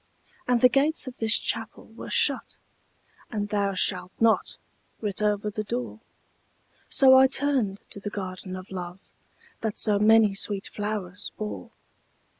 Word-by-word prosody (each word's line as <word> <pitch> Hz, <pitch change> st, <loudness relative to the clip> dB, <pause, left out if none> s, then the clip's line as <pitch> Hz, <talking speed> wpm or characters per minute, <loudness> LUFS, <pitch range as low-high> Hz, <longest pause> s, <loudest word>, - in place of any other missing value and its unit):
And 245 Hz, -2 st, +2 dB
the 250 Hz, -, +8 dB
gates 285 Hz, +5 st, +1 dB
of 255 Hz, -1 st, -8 dB
this 220 Hz, -1 st, +4 dB
Chapel -, -, -3 dB
were -, -, -10 dB
shut, -, -, +2 dB, 0.7 s
And 205 Hz, -2 st, -3 dB
'Thou 200 Hz, -2 st, 0 dB
shalt 185 Hz, -, 0 dB
not' 230 Hz, -1 st, +2 dB, 0.4 s
writ 210 Hz, -2 st, -3 dB
over 210 Hz, 0 st, 0 dB
the 215 Hz, +1 st, -4 dB
door; 235 Hz, +1 st, -4 dB, 0.9 s
So 265 Hz, -1 st, +6 dB
I 265 Hz, 0 st, +7 dB
turned 260 Hz, -8 st, 0 dB
to -, -, -7 dB
the 205 Hz, -, -5 dB
Garden 185 Hz, -2 st, -6 dB
of 185 Hz, +1 st, -10 dB
Love 180 Hz, 0 st, -6 dB, 0.6 s
That 220 Hz, -2 st, -3 dB
so 210 Hz, -2 st, +1 dB
many 215 Hz, -1 st, +5 dB
sweet 195 Hz, 0 st, -3 dB
flowers 205 Hz, -3 st, -5 dB
bore. 215 Hz, -1 st, -6 dB
210 Hz, 145 wpm, -26 LUFS, 200-230 Hz, 0.9 s, the